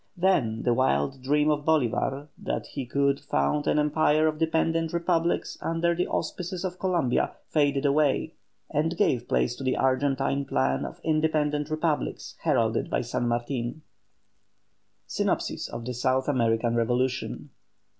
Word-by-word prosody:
Then 145 -12 +1
the 120 - +3
wild 70 - +1
dream 150 +3 +2
of 145 -1 -1
Bolívar 145 -1 0
that - - -4
he 135 -3 -6
could 140 +2 +1
found 150 -1 0
an - - +2
empire 150 +1 +3
of 155 -1 0
dependent 165 0 +1
republics 170 0 0
under 165 +1 +1
the 180 +1 -1
auspices 180 +1 -3
of 185 0 -4
Columbia 175 -10 +1 0.2
faded 145 -2 +2
away, 145 0 +2 0.4
and 165 +3 0
gave 120 -1 +1
place 120 - +1
to - - -7
the 130 - 0
Argentine 135 +1 +1
plan 65 - 0
of - - -9
independent 155 -1 +1
republics 155 -1 -2
heralded - - +1
by - - 0
San 120 - -2
Martin. 120 +4 -2 1.2
SYNOPSIS - - -1
OF 115 0 -6
THE 125 - -3
SOUTH 130 +2 0
AMERICAN 115 -4 +1
REVOLUTION. 125 +4 -1
145 Hz, 140 wpm, -27 LUFS, 125-160 Hz, 1.2 s, the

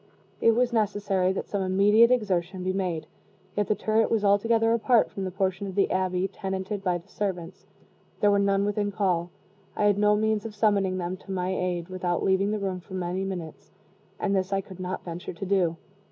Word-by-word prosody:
It 230 - +5
was 245 0 +1
necessary 205 -4 +1
that - - -4
some 200 - -2
immediate 200 +5 +5
exertion 190 -6 0
be 185 0 0
made; 180 -5 -2 0.5
yet 205 -1 0
the 210 - +2
turret 220 +1 +1
was 220 -2 +1
altogether 225 +3 +3
apart 235 0 +3
from 195 - -4
the - - -2
portion 190 +1 -1
of 190 - -7
the 200 - +2
abbey 185 0 0
tenanted 190 +1 -4
by 180 -2 +1
the 175 +3 -15
servants 185 -4 -5 0.5
there 205 - +4
were 200 - +3
none 200 0 +2
within 205 0 -1
call 180 -4 0 0.5
I - - 0
had 205 -1 +3
no 210 0 +4
means 215 0 +1
of 220 -2 -7
summoning 200 -3 +2
them 180 +1 -3
to 195 - -11
my 185 -1 -1
aid 180 -1 -2
without 180 -2 -2
leaving 190 +1 +2
the 215 - 0
room 190 -2 -3
for 190 +2 -10
many 180 +1 -2
minutes 180 -5 -6 0.5
and 200 -1 0
this 190 0 0
I 195 - +2
could 190 -1 -10
not 185 0 -4
venture 175 +1 -6
to 185 +4 -6
do. 180 -4 +1
195 Hz, 205 wpm, -26 LUFS, 185-205 Hz, 0.5 s, It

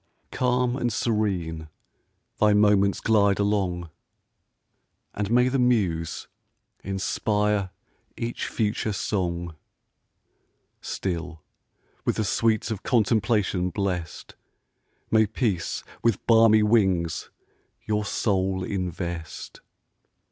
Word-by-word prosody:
Calm 125 0 +1
and 120 -3 -1
serene 90 -9 -1 0.7
thy 105 0 +5
moments 105 -1 +3
glide 100 -3 +3
along, 95 -5 -1 1.2
And 105 -1 -3
may 125 +2 +4
the 130 +1 0
muse 95 -10 0 0.6
inspire 100 +1 0 0.5
each 120 +1 -3
future 105 -1 -1
song! 85 -4 -2 1.3
Still, 85 -4 -4 0.6
with - - 0
the 110 - 0
sweets 110 +2 +1
of 105 -3 -4
contemplation 105 -5 +1
bless'd, 90 -3 -4 0.8
May 110 -1 +4
peace 105 -5 -2 0.2
with 115 -4 0
balmy 110 -2 +6
wings 95 -7 +1 0.6
your 105 -2 0
soul 95 -2 0
invest! 85 -4 -5
105 Hz, 90 wpm, -25 LUFS, 90-110 Hz, 1.3 s, balmy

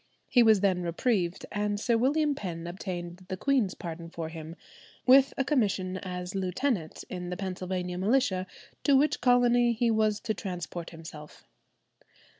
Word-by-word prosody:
He 245 - +5
was 220 -4 +5
then 190 -3 +2
reprieved, 175 +1 0
and 205 0 -1
Sir 235 +2 +2
William 290 +5 +2
Penn 170 -9 -5
obtained 175 0 -6
the 185 - -3
queen's 255 -5 +1
pardon 165 -1 -7
for 165 -1 -5
him, 160 0 -8 0.5
with 270 +2 +7
a 270 - +2
commission 200 -9 0
as 180 -1 -5
lieutenant 190 - -2
in 180 -1 -5
the 180 - -4
Pennsylvania 185 -1 -3
militia, 195 -3 +1 0.4
to 280 -2 +5
which 295 +3 +2
colony 245 -1 +4
he 230 +1 +1
was 215 -1 +2
to 220 - -1
transport 175 -4 -5
himself. 160 -2 -11
190 Hz, 150 wpm, -29 LUFS, 180-240 Hz, 0.5 s, with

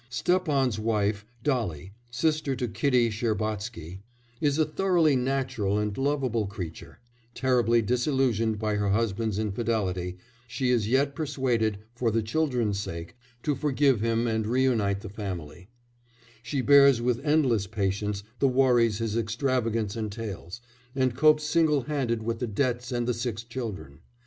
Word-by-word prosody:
Stepan's 135 - +1
wife 105 -1 0 0.2
Dolly, 100 - -1 0.2
sister 145 +3 0
to 125 0 -2
Kitty 125 -1 +2
Shcherbatsky 105 -5 -3 0.4
is 145 -1 +2
a 155 - +3
thoroughly 165 -2 +2
natural 125 -6 0
and 105 -1 -1
lovable 135 -6 0
creature; 90 -5 -8 0.4
terribly 120 -2 +2
disillusioned 120 -2 +1
by 105 -1 -1
her 105 -1 0
husband's 110 0 0
infidelity, 100 -4 -2 0.3
she 125 +1 -1
is 115 -4 +1
yet 140 +3 +2
persuaded, 130 -8 0 0.2
for 120 -1 0
the 115 0 0
children's 120 -5 0
sake, 85 -2 -6 0.3
to 150 - +1
forgive 135 -3 +2
him 115 +1 +1
and 110 -2 0
reunite 115 -5 +1
the 110 - -7
family; 95 -3 -7 0.7
she 135 +2 -2
bears 140 -2 +6
with 120 +1 0
endless 135 -10 +2
patience 100 0 -2 0.2
the 140 - +4
worries 125 -4 +3
his 110 -1 -2
extravagance 115 -2 -1
entails, 105 -2 -6 0.3
and 130 -3 +1
copes 155 +2 +4
single 155 -3 +2
handed 120 -5 -1
with 115 0 -2
the 125 - -2
debts 120 +2 -1
and 120 -1 -1
the 125 - +2
six 115 -1 -3
children. 105 - -6
115 Hz, 140 wpm, -27 LUFS, 105-130 Hz, 0.7 s, bears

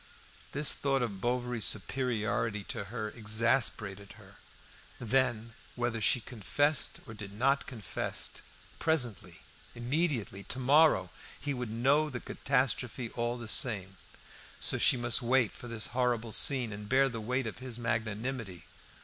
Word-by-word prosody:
This 145 +1 +3
thought 135 -2 +1
of 100 -5 -4
Bovary's 120 -2 0
superiority 110 -2 0
to 110 -4 -4
her 110 0 -4
exasperated 110 -3 0
her. 100 -2 -16 0.6
Then, 115 -2 0 0.2
whether 120 -2 -1
she 120 +3 +4
confessed 130 +6 0
or 110 - -9
did 100 -2 -8
not 135 +5 +2
confess, 110 -9 -4 0.5
presently, 120 - 0 0.3
immediately, 120 - -1
to - - -1
morrow, 140 - +4 0.3
he 145 +1 -2
would 125 -3 -4
know 135 +7 +2
the 125 -4 -5
catastrophe 125 -3 -1
all 120 0 -2
the 115 -1 -7
same; 100 -7 0 0.6
so - - 0
she - - +6
must 120 +2 +2
wait 125 -2 +3
for 120 - -10
this 115 -2 -2
horrible 120 -3 0
scene, 125 -2 +3
and 105 0 -8
bear 135 +1 +5
the 115 -4 -5
weight 125 +4 -1
of 110 - -5
his 130 -2 -5
magnanimity. 115 -4 -3
120 Hz, 140 wpm, -31 LUFS, 110-130 Hz, 0.6 s, she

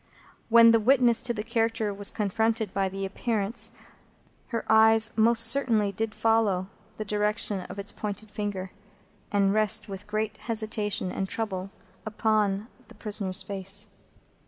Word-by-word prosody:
When 230 0 +8
the 230 - +4
witness 245 0 +3
to 235 -4 -2
character 225 -2 -1
was 200 0 -2
confronted 220 0 -1
by 195 -1 0
the 195 +1 -4
Appearance, 210 +2 -2 0.8
her 230 -2 -4
eyes 220 +1 +5
most 230 0 +4
certainly 225 -5 +2
did 215 +2 -3
follow 220 -5 +1 0.3
the 215 - -4
direction 210 0 0
of - - -8
its 200 +1 -1
pointed 210 0 -6
finger, 200 -3 -4 0.6
and 200 -1 +2
rest 215 0 +1
in 195 -2 -6
great 215 +1 -3
hesitation 215 -4 0
and 190 0 -3
trouble 195 -4 -3 0.3
upon 215 -2 0 0.2
the - - -16
prisoner's 200 -3 -1
face. 195 +2 -2
215 Hz, 135 wpm, -27 LUFS, 200-225 Hz, 0.8 s, When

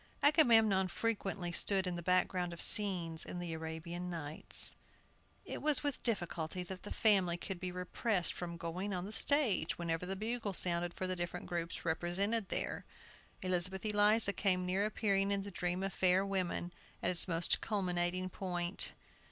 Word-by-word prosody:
Agamemnon 225 - +5
frequently 195 -3 -2
stood 190 +2 +1
in 180 -1 -2
the 170 - -4
background 180 0 +1
of 170 - -10
scenes 180 -6 +2
in - - -7
the 175 -2 -4
Arabian 160 +2 -5
Nights. 160 -3 0 0.7
It - - -5
was 300 -1 +3
with 285 -2 -2
difficulty 180 -5 -1
that 185 +1 -8
the 205 - -8
family 190 -6 +3
could 185 +1 -6
be 185 0 -4
repressed 180 +1 0
from 170 -1 -6
going 180 +4 -3
on 180 0 -3
the 205 - -7
stage 225 - +2
whenever 170 0 -2
the 195 - -2
bugle 220 0 -3
sounded 175 -1 +1
for 185 - -3
the 185 0 -1
different 175 0 -4
groups 170 0 -4
represented 185 +6 0
there. - - -2 0.6
Elizabeth 185 +2 0
Eliza 210 0 +4
came 185 -3 +1
near 190 +3 +1
appearing 200 -2 +1
in 200 -1 0
the 200 - -7
"Dream 180 +1 -2
of 195 -1 -2
Fair 185 +1 +3
Women," 180 -2 -2 0.3
at - - +2
its 175 0 +3
most 165 -1 +2
culminating 185 -3 0
point. 180 -1 -1
185 Hz, 165 wpm, -35 LUFS, 175-200 Hz, 0.7 s, Agamemnon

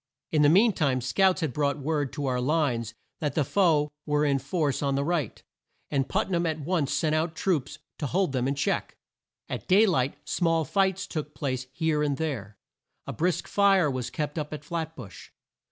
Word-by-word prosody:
In 155 - +3
the 145 - +6
mean 205 +7 +5
time 140 -7 +1
scouts 185 +10 +2
had 155 -6 -1
brought 145 +1 0
word 145 -1 -1
to 145 - -3
our 125 -2 0
lines 125 -6 0 0.2
that 150 -5 -2
the 155 - +3
foe 155 -4 +2
were 150 0 +1
in 140 -2 +2
force 145 +1 -1
on 140 -1 0
the 140 - +1
right, 155 -5 -2 0.5
and 135 -2 0
Put - - 0
nam 170 -1 +1
at 160 -1 -2
once 155 -2 0
sent 155 -2 +1
out 160 +1 0
troops 155 -7 -1 0.2
to 145 - -1
hold 185 +1 +1
them 130 -1 0
in 140 - 0
check. 140 - -1 0.5
At - - -5
day 200 +4 +6
light 140 -8 +1
small 165 -2 +1
fights 190 +3 +1
took 150 -2 -5
place 130 -3 -3
here 155 +1 0
and 145 -2 0
there. 115 -11 -4 0.5
A - - -5
brisk 175 +2 0
fire 195 -6 +4
was 125 -2 -3
kept 150 +3 -3
up 150 -1 -4
at 150 - -10
Flat 160 -1 -4
bush. 115 -9 -11
150 Hz, 200 wpm, -27 LUFS, 135-170 Hz, 0.5 s, the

